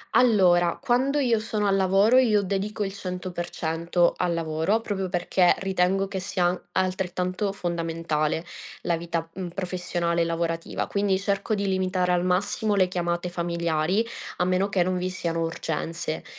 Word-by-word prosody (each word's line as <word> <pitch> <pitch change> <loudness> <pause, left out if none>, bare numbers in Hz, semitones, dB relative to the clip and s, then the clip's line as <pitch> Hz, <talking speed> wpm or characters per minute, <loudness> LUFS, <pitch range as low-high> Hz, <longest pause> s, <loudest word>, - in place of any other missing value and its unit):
Allora, 180 -7 +4
quando 265 +4 +2
io 235 -5 +2
sono 215 -2 -1
al 195 0 +3
lavoro 195 +6 +4
io 220 -5 +4
dedico 200 +2 -2
il 195 - -3
100% 175 -2 -1
al 175 -1 0
lavoro, 165 +6 0
proprio 195 -3 -2
perché 180 0 +2
ritengo 195 0 +1
che 195 - -3
sia 185 -1 0
an 180 +1 -1
altrettanto 185 +1 -1
fondamentale 165 -3 -1 0.4
la 170 -1 0
vita, 165 -1 -3
mhmm, 185 -1 -5
professionale 175 -2 -1
e - - +2
lavorativa. 165 0 -2
Quindi 200 -1 +1
cerco 200 +2 -1
di 200 0 -2
limitare 185 -1 +1
al 180 0 +2
massimo 205 +3 +1
le 185 -2 +3
chiamate 175 0 -1
familiari, 170 +3 0 0.3
a - - +1
meno 185 +2 +2
che 190 -3 +2
non 185 0 -1
vi 180 +1 -1
siano 170 -3 -2
urgenze. 165 0 -3
185 Hz, 155 wpm, -25 LUFS, 170-195 Hz, 0.4 s, Allora